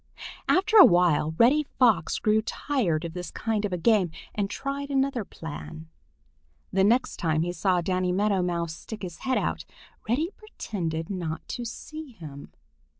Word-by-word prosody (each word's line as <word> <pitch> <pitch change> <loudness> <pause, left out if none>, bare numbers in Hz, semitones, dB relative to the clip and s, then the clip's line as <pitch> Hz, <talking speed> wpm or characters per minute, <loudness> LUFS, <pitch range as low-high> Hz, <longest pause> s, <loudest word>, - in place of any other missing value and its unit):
After 435 +4 +4
a 400 - +12
while 170 -3 +4
Reddy 265 +6 +5
Fox 230 - +2
grew 215 0 +2
tired 215 - -1
of 165 - -5
this 180 0 -5
kind 220 -2 -2
of 200 - -3
a 180 - -1
game 190 0 +3 0.2
and 200 -2 -1
tried 280 +5 -4
another 270 -3 0
plan. 160 -2 -9 0.8
The 190 0 +3
next 235 +6 +2
time 160 -2 +1
he 175 - -2
saw 180 0 +1
Danny 185 +1 0
Meadow 200 0 +2
Mouse 170 -2 -1
stick 215 +5 -9
his 175 -3 -6
head 260 -1 0
out, - - -1 0.5
Reddy 305 - +1
pretended 170 - -5
not 165 -4 -4
to 240 - -4
see 305 +4 -8
him. 150 -8 -10
195 Hz, 160 wpm, -26 LUFS, 170-245 Hz, 0.8 s, a